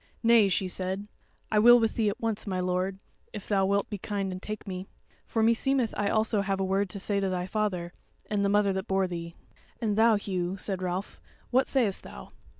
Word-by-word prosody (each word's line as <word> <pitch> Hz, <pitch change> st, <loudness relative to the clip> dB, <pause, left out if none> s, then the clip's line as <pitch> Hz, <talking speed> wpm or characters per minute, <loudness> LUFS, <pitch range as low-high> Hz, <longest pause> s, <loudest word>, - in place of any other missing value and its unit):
"Nay," 230 Hz, -3 st, +6 dB
she 190 Hz, 0 st, 0 dB
said, 190 Hz, +2 st, -3 dB, 0.4 s
"I 215 Hz, -, +4 dB
will 240 Hz, +3 st, +8 dB
with 225 Hz, -1 st, +1 dB
thee 220 Hz, -3 st, +1 dB
at 200 Hz, -, -5 dB
once, 220 Hz, -2 st, -2 dB
my 185 Hz, -2 st, -1 dB
lord, 185 Hz, +1 st, -1 dB, 0.4 s
if 205 Hz, -, -7 dB
thou 195 Hz, -2 st, +2 dB
wilt 200 Hz, 0 st, +1 dB
be 205 Hz, -, -5 dB
kind 195 Hz, 0 st, -3 dB
and 185 Hz, 0 st, -6 dB
take 215 Hz, 0 st, -6 dB
me; 185 Hz, 0 st, -5 dB, 0.4 s
for 225 Hz, -, 0 dB
meseemeth 235 Hz, +1 st, +2 dB
I 205 Hz, -1 st, 0 dB
also 220 Hz, -1 st, +1 dB
have 195 Hz, -1 st, -1 dB
a 190 Hz, -, +1 dB
word 195 Hz, +1 st, 0 dB
to 200 Hz, -, -6 dB
say 200 Hz, +1 st, 0 dB
to 195 Hz, -1 st, 0 dB
thy 180 Hz, -1 st, -2 dB
father, 185 Hz, -4 st, -2 dB, 0.3 s
and 205 Hz, -1 st, 0 dB
the 200 Hz, -, +2 dB
mother 205 Hz, -1 st, +3 dB
that 190 Hz, 0 st, -3 dB
bore 190 Hz, 0 st, +2 dB
thee." 170 Hz, -2 st, -6 dB, 0.4 s
"And 215 Hz, -3 st, 0 dB
thou, 225 Hz, +1 st, +5 dB
Hugh," 185 Hz, -2 st, -2 dB
said 190 Hz, -1 st, -2 dB
Ralph, 185 Hz, +2 st, -4 dB, 0.3 s
"what 260 Hz, +1 st, +3 dB
sayest 230 Hz, -8 st, +1 dB
thou?" 65 Hz, -, -11 dB
200 Hz, 215 wpm, -28 LUFS, 185-215 Hz, 0.4 s, will